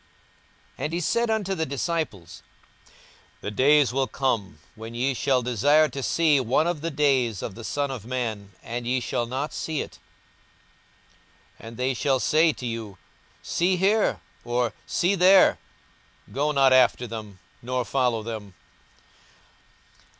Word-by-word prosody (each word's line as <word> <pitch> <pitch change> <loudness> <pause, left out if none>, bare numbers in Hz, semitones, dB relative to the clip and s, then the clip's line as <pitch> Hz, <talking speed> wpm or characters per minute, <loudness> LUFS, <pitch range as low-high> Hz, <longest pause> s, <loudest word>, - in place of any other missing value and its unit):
42:017:022 - - -2
And 155 - -3
he 170 - 0
said 235 +7 0
unto 210 -3 0
the 160 -4 -1
disciples, 140 - -4 1.0
The 100 - -4
days 140 +3 +4
will 135 0 +1
come, 110 - -2 0.2
when 115 +1 -9
ye 130 +3 0
shall 130 0 +1
desire 145 +6 +3
to 140 - -6
see 155 +1 +3
one 130 +5 +1
of 170 -3 -2
the 165 - -2
days 135 - +1
of 105 - -5
the 115 - -10
Son 140 +4 -2
of 125 -6 -6
man, 110 -5 -4
and 120 +1 -5
ye 130 +1 +1
shall 120 0 -2
not 135 +5 -3
see 160 -3 -3
it. - - -9 1.6
42:017:023 - - -11
And 115 0 -10
they 130 +1 0
shall 135 +1 +1
say 160 +5 +3
to 130 - -8
you, 115 -5 -5 0.5
See 180 +2 +1
here; 205 +4 +2 0.2
or, 120 0 -1
see 180 +3 +1
there: 190 0 +5 0.7
go 145 +3 0
not 135 -2 +4
after 125 -1 +4
them, 110 -4 -8 0.2
nor 125 0 -2
follow 125 -4 0
them. 105 -4 -7
130 Hz, 150 wpm, -25 LUFS, 115-150 Hz, 1.6 s, there